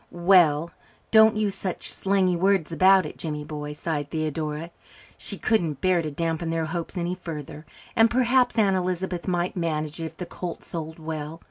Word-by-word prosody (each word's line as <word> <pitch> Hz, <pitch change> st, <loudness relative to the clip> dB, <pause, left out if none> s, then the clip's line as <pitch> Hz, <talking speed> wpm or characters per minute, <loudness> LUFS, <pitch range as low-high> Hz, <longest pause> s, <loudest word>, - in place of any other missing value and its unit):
"Well, 170 Hz, -3 st, +4 dB, 0.4 s
don't 220 Hz, 0 st, +7 dB
use 210 Hz, -2 st, 0 dB
such 185 Hz, -2 st, -4 dB
slangy 190 Hz, -2 st, +1 dB
words 190 Hz, -2 st, +2 dB
about 190 Hz, +1 st, +5 dB
it, 150 Hz, -, -8 dB
Jimmy 150 Hz, -2 st, -3 dB
boy," 150 Hz, 0 st, -6 dB
sighed 150 Hz, -1 st, -3 dB
Theodora. 155 Hz, +1 st, -3 dB, 0.4 s
She -, -, -6 dB
couldn't 170 Hz, -10 st, 0 dB
bear 185 Hz, -2 st, +2 dB
to 155 Hz, -, -3 dB
dampen 165 Hz, +2 st, -2 dB
their 165 Hz, -1 st, 0 dB
hopes 170 Hz, +2 st, -5 dB
any 175 Hz, 0 st, -1 dB
further, 155 Hz, -3 st, -7 dB, 0.3 s
and 225 Hz, 0 st, +5 dB
perhaps 245 Hz, 0 st, +2 dB
Aunt 200 Hz, -3 st, +4 dB
Elizabeth 185 Hz, -1 st, -2 dB
might 175 Hz, -1 st, 0 dB
manage 155 Hz, -2 st, -2 dB
it -, -, -2 dB
if 160 Hz, -, -8 dB
the 180 Hz, -, -5 dB
colt 175 Hz, 0 st, -6 dB
sold 160 Hz, -1 st, -6 dB
well. 160 Hz, 0 st, -6 dB
170 Hz, 170 wpm, -25 LUFS, 155-190 Hz, 0.4 s, don't